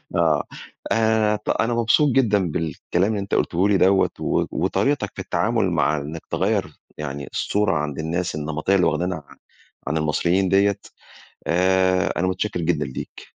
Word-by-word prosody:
آه. 80 -3 +2 0.5
آآ، 110 -1 +2
ط 105 - -8
أنا 120 +1 +1
مبسوط 120 +6 +3
جدًا 105 - +2
بالكلام 85 +5 -1
اللي 105 - -1
أنت 100 0 -2
قُلته 90 +4 +1
لي 100 - +4
دوّة 95 +1 +4
و - - 0
وطريقتك 100 - 0
في - - -5
التعامل 105 0 0
مع 75 -2 +1
إنّك 75 +3 -6
تغيّر 95 -1 -1 0.2
يعني 70 -1 -5
الصورة 105 -1 0
عند 75 -1 -3
الناس 85 +3 -2
النمطيّة 80 +5 -1
اللي 90 - +3
واخدينها 90 -3 -2
عن - - -15 0.5
عن 80 - 0
المصريين 85 +5 +1
دية، 100 +1 +3 0.7
آآ 95 +1 +2
أنا 90 - +1
مُتشكِّر 95 0 -2
جدًا 80 -3 0
ليك. 65 - -7
95 Hz, 155 wpm, -22 LUFS, 80-100 Hz, 0.7 s, لي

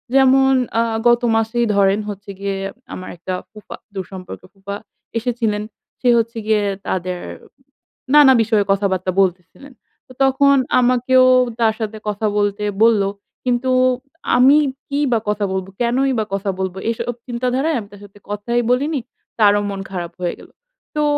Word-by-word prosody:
যেমন 265 0 +5 0.3
আ - - +4 0.2
গত 240 +1 +4
মাসেই 225 +2 +1
ধরেন 200 +1 +3
হচ্ছে 200 0 -8
গিয়ে 200 -1 -2 0.4
আমার 185 - -7
একটা 185 +2 -5 0.2
ফুফা, 215 -2 -10 0.2
দূরসম্পর্কের 185 -1 -8
ফুফা 200 +1 -7 0.4
এসেছিলেন। 225 -3 -1 0.4
সে 250 - +3
হচ্ছে 230 +1 -3
গিয়ে 215 -1 +2 0.2
তাদের 180 -1 -2 1.0
নানা 280 -3 +8
বিষয়ে 215 -2 +2
কথাবার্তা 190 -2 0
বলতেসিলেন। 185 +9 -3 0.3
তো 255 - -14
তখন 280 +1 +4 0.2
আমাকেও 255 +1 +4 0.3
তার 220 -1 +3
সাথে 215 0 -4
কথা 210 +1 -3
বলতে 205 0 0 0.2
বলল, 225 -3 +5 0.4
কিন্তু 250 +1 +1 0.7
আমি 270 +4 +6 0.3
কি 280 +1 -1
বা 225 - +3
কথা 210 -1 0
বলব? 190 0 -3
কেনই 260 +3 +2
বা 215 - 0
কথা 200 0 -3
বলব? 190 -1 -2 0.2
এসব 235 +1 -3
চিন্তাধারায় 255 +5 0
আমি 205 - -9
তার 205 - -13
সাথে 205 +1 -18
কথাই 235 +4 -1
বলিনি। 280 +2 0 0.4
তারও 205 -1 +5
মন 195 -1 -5
খারাপ 175 -2 -4
হয়ে 175 - -1
গেল। - - -15 0.5
তো 300 - +1
220 Hz, 145 wpm, -19 LUFS, 200-250 Hz, 1.0 s, নানা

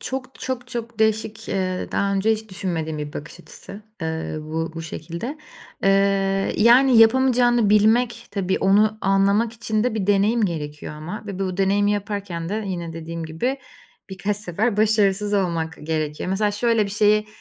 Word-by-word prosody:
Çok, 260 0 -5
çok, 250 -1 -4
çok 235 -1 -6
değişik, 220 0 0
eee 185 -1 -2
daha 200 0 +1
önce 205 +3 +2
hiç 220 0 -4
düşünmediğim 165 -5 -3
bir 150 0 -5
bakış 155 +4 -8
açısı, 200 +3 -12 0.2
eee, 160 -1 -3
bu 160 +2 -3
bu 165 - -5
şekilde. 170 - -6 0.5
Eee, 195 0 +2
yani, 240 +2 +6
yapamayacağını 240 -2 +4
bilmek, 230 +3 +3
tabii, 190 -2 -1
onu 210 +3 +3
anlamak 200 +3 +2
için 225 -1 -1
de 250 - 0
bir 200 -3 -2
deneyim 205 +3 +3
gerekiyor 150 -3 -5
ama 170 +9 -7
ve 200 -2 -6
bu 185 -2 -2
deneyimi 200 +1 +2
yaparken 200 -5 -4
de 215 +2 -3
yine 170 -3 -4
dediğim 165 0 -6
gibi 245 - -2 0.5
birkaç 200 +2 -2
sefer 210 +3 -1
başarısız 210 -1 +2
olmak 165 -4 -1
gerekiyor. 155 +2 -2
Mesela, 205 +2 +1
şöyle 220 +1 +1
bir 200 - -5
şeyi 210 +1 +3
200 Hz, 160 wpm, -22 LUFS, 175-220 Hz, 0.5 s, yani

